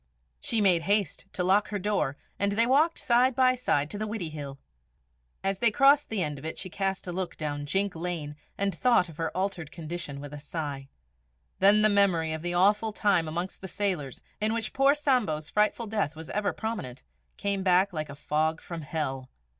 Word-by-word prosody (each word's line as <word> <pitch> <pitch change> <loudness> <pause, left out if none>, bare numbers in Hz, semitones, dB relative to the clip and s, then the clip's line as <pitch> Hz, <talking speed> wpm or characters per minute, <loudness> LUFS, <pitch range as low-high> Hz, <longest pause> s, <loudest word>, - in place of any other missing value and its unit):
She 225 - +1
made 180 -4 +4
haste 200 +1 0
to 180 - -1
lock 195 +3 +3
her 210 - -3
door, 185 -9 -1 0.2
and 200 0 +2
they 230 +3 +4
walked 295 +7 +3
side 245 +1 +3
by 255 -1 +4
side 150 - 0
to 205 - -5
the 215 - -2
Widdiehill. 155 -10 -5 0.9
As 195 0 0
they 235 - +5
crossed 280 +5 +4
the 210 -5 -1
end 150 -3 -4
of - - -14
it 160 - -5
she 185 - -6
cast 195 0 -2
a 180 - -4
look 180 0 -4
down 145 -2 -4
Jink 195 +3 0
Lane, 160 -3 -4 0.2
and 200 -1 +1
thought 235 -2 +3
of 155 - -12
her 165 -1 -1
altered 185 -5 -2
condition 160 -3 -6
with 145 0 -8
a 145 - -7
sigh. 145 -3 -5 0.7
Then 205 +2 +6
the - - +8
memory 185 -6 +3
of 160 - -4
the 175 +1 -2
awful 210 +4 +3
time 200 -6 +2
amongst 175 +4 -4
the 190 - -6
sailors, 180 -10 -2 0.2
in 215 +2 +1
which 225 -1 -3
poor 275 +2 +4
Sambo's 230 - 0
frightful 215 +2 +1
death 205 -8 -2
was 160 0 -9
ever 210 -1 0
prominent, 195 - -5 0.3
came 200 -1 -1
back 185 +1 +3
like 155 -2 -4
a 140 - -8
fog 155 +2 0
from 170 -2 -7
hell. 135 -4 -4
185 Hz, 200 wpm, -28 LUFS, 155-210 Hz, 0.9 s, the